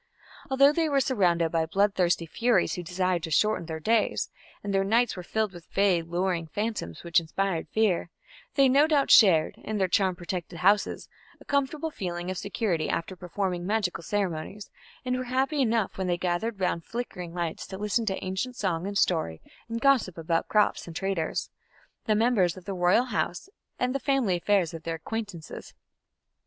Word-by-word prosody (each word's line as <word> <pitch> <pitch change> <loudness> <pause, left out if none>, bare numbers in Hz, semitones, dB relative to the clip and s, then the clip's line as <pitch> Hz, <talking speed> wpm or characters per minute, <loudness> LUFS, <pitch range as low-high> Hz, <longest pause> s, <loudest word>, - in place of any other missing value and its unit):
Although 275 +2 +5
they 325 0 +1
were 280 -1 +3
surrounded 175 -11 +2
by 165 -1 +1
bloodthirsty 185 -2 +2
furies 225 +3 +1
who 180 - -3
desired 180 0 -1
to 165 - -5
shorten 170 +1 +1
their 160 -1 -4
days, 220 +6 +1 0.3
and 200 -1 -3
their 195 0 +3
nights 230 +5 +2
were 180 - -6
filled 215 +2 -2
with 175 -2 -12
vague 185 -4 +2
lowering 175 -2 0
phantoms 205 - -4
which 170 +1 +3
inspired 170 +1 -2
fear, 210 -6 +1 0.5
they 275 -2 +5
no 280 +4 +5
doubt 295 -3 +2
shared, 170 -8 +6
in 215 - -4
their 190 -2 +2
charm 185 0 +2
protected 175 0 -5
houses, 200 +2 +2 0.3
a - - -16
comfortable 285 +3 -1
feeling 175 -5 -4
of 185 - -4
security 200 -6 -1
after 185 +3 -2
performing 180 0 -3
magical 205 -5 0
ceremonies, 195 +1 -3 0.3
and 250 0 0
were 255 - -3
happy 270 +4 0
enough 225 -6 0
when 190 - -1
they 175 -1 +1
gathered 185 +5 -2
round 175 -3 0
flickering 180 -7 -5
lights 170 -2 -3
to 190 - -7
listen 210 +3 0
to 190 - -2
ancient 190 +7 -3
song 185 -4 -1
and 200 0 -2
story 160 - +1 0.3
and 230 0 -3
gossip 255 -10 +3
about 165 0 -1
crops 210 -3 +2
and 165 - -9
traders, 190 -4 -2 0.5
the 215 - +2
members 210 -7 +2
of 185 - -12
the 200 - -3
royal 180 +6 +3
house, 215 - -2 0.3
and 250 0 0
the 275 - -1
family 265 -9 +1
affairs 180 -1 +1
of 165 - -7
their 165 0 -3
acquaintances. 200 -1 -7
190 Hz, 180 wpm, -27 LUFS, 175-225 Hz, 0.5 s, shared